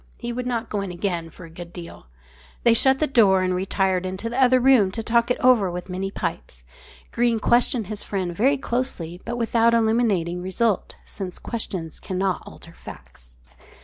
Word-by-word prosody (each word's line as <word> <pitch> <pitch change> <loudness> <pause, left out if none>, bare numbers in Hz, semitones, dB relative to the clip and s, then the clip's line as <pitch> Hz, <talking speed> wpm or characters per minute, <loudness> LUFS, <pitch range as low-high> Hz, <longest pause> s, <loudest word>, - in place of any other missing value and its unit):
He 240 0 -4
would 250 +1 -4
not 235 -2 -2
go 205 - -2
in 195 - -4
again 175 -2 -3
for 170 - -12
a - - -12
good 170 +1 -10
deal. 170 - -10 0.6
They 235 - +6
shut 265 +3 +4
the 310 - +1
door 200 -9 +4
and 185 0 0
retired 190 0 0
into 190 +5 -4
the 255 +3 0
other 255 0 +5
room 250 -6 +5
to 225 - -4
talk 235 +1 +2
it 250 - 0
all 255 - +6
over 210 -7 +2
with 180 +1 -6
many 190 +2 -3
pipes. - - -5 0.5
Greene 235 -1 +1
questioned 240 0 +2
his 210 +2 -6
friend 185 -4 -3
very 270 +8 +3
closely, 235 -10 -3
but 240 +1 -3
without 230 0 +3
illuminating 220 -7 +1
result, 190 +3 -1
since 185 -3 -7
questions 185 -8 -5
cannot 190 0 -2
alter 170 - -12
facts. - - -14
205 Hz, 185 wpm, -23 LUFS, 180-235 Hz, 0.6 s, They